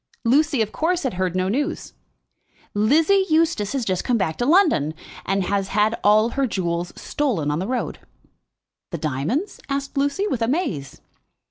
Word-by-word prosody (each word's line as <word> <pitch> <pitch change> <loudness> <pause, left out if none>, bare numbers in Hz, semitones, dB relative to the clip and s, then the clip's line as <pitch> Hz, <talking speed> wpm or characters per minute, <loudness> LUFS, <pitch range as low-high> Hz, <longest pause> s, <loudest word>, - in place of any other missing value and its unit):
Lucy, 275 0 +3
of 215 - -6
course, 345 +2 0
had 260 - -1
heard 185 -1 -1
no 185 0 +1
news. 285 - -2 0.8
"Lizzie 310 - +3
Eustace 315 -10 +2
has 265 -4 -1
just 185 -3 -1
come 245 - +1
back 185 -6 -1
to 245 - -1
London, 300 - +3 0.3
and 195 0 +1
has 195 +1 -1
had 210 +2 +2
all 215 +2 +5
her 275 +1 0
jewels 175 -4 -2
stolen 215 - -1
on 150 - -1
the 190 - -3
road." 250 0 -3 0.9
"The 170 - -4
diamonds?" 155 - -2
asked 275 0 -3
Lucy, 285 +8 0
with 260 - -2
amaze. 225 - -2
225 Hz, 160 wpm, -22 LUFS, 185-285 Hz, 0.9 s, all